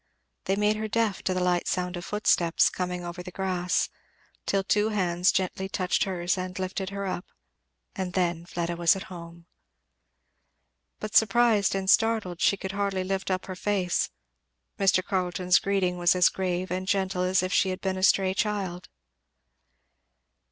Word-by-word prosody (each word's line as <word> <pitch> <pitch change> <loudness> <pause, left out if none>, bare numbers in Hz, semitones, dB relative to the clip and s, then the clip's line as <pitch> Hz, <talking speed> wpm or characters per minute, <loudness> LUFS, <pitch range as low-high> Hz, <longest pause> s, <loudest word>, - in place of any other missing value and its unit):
They 195 - +1
made 210 +1 +1
her 220 0 -3
deaf 215 -2 0
to 185 - +1
the 180 - 0
light 180 -1 +1
sound 180 0 -1
of 175 - -6
footsteps 175 -5 +2
coming 180 -1 -4
over 175 +1 -6
the 180 - -8
grass, 180 -1 -1 0.6
till 195 -1 +1
two 210 +2 +2
hands 180 -3 +2
gently 190 0 -2
touched 185 -2 0
hers 180 -1 -1
and 185 0 -5
lifted 190 0 -3
her 200 0 -4
up, 185 -2 -4 0.7
and 185 -2 -4
then 175 -2 -1
Fleda 170 0 -3
was 170 +1 +4
at 190 - -5
home. 170 -1 -11 1.5
But 215 0 -6
surprised 220 -2 +4
and 190 -1 -2
startled 220 -5 +2
she 200 - +3
could 190 0 -5
hardly 200 -1 -1
lift 195 +1 -3
up 185 -1 -1
her 185 - -6
face. 190 -2 0 0.7
Mr. 190 -2 +3
Carleton's 180 -1 +1
greeting 185 -3 0
was 175 +1 +4
as 180 -1 +5
grave 185 -1 -3
and 185 +1 -3
gentle 190 -1 0
as 185 0 +2
if 185 - -2
she 190 - +3
had 185 - -3
been 190 -1 -2
a - - -5
stray 190 -1 +3
child. 195 -4 -2
185 Hz, 165 wpm, -27 LUFS, 180-195 Hz, 1.5 s, as